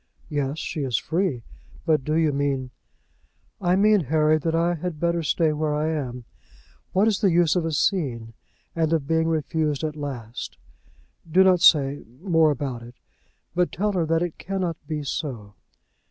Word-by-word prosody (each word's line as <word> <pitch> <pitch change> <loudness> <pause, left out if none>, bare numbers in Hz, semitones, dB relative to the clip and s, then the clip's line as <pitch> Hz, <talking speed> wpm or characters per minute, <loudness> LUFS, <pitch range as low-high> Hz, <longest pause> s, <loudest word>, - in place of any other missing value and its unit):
"Yes, 145 0 -1
she 155 - -4
is 125 -5 0
free. 160 -7 -1 0.4
But 155 -4 +2
do 155 +3 -1
you 160 -2 +2
mean 135 -2 -1 0.4
?" - - -40
"I - - +5
mean, 205 -3 +4
Harry, 155 +2 +3
that 165 +2 -1
I 170 +1 +2
had 170 -1 -5
better 170 0 +1
stay 160 0 +1
where 150 0 -1
I 155 +1 0
am. 125 -6 -4 0.7
What 195 +4 +3
is 215 -2 +1
the 200 - +4
use 170 -1 +3
of 175 -2 +1
a 165 - -1
scene, 130 - -1 0.4
and 165 -1 +1
of 155 -4 0
being 160 +2 +1
refused 155 -2 -1
at 155 -1 -2
last? 125 -6 -6 0.7
Do 185 +4 +6
not 185 -2 +4
say 145 -5 +5 0.2
more 165 -3 +3
about 135 -4 -3
it, 120 +1 -12 0.6
but 180 +1 +1
tell 210 +4 0
her 175 -5 0
that 165 +1 +2
it 175 -2 -5
cannot 185 -4 -3
be 155 -2 -3
so." 125 -8 -5
155 Hz, 175 wpm, -24 LUFS, 140-170 Hz, 0.7 s, Do